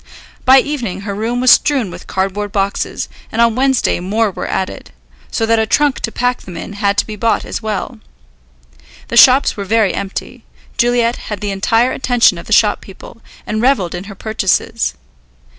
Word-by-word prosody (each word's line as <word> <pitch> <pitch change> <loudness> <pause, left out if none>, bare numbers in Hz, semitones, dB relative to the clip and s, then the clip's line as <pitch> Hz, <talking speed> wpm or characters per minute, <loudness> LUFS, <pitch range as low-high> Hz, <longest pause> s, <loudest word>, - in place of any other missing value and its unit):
By 260 +1 +7
evening 235 -11 -4
her 200 0 -5
room 230 +4 -2
was 255 - +6
strewn 265 - +3
with - - -11
cardboard 195 +2 -2
boxes, 195 0 -2 0.2
and 225 - -4
on 235 -1 +4
Wednesday 265 -3 +1
more 210 +4 0
were - - -5
added, 190 - -4 0.4
so 225 - -1
that 225 0 +2
a 220 - 0
trunk 290 +3 +2
to 225 - -3
pack 245 +1 -1
them 180 -3 -10
in 195 - -7
had 200 -1 0
to - - +2
be 215 - -7
bought 225 +2 0
as - - -5
well. 215 -3 -4 1.1
The 235 - -1
shops 260 +3 +6
were 200 - -4
very 210 -1 +1
empty; 195 -1 -6 0.3
Juliet 240 -1 +1
had 210 -2 -4
the 205 -1 -3
entire 225 +5 +1
attention 245 -9 +2
of - - -11
the - - -10
shop 210 -1 +3
people, 200 +4 -13 0.2
and 215 0 -2
revelled 240 -9 +1
in 180 +2 -6
her 200 -1 -10
purchases. 190 - -1
220 Hz, 185 wpm, -16 LUFS, 195-240 Hz, 1.1 s, By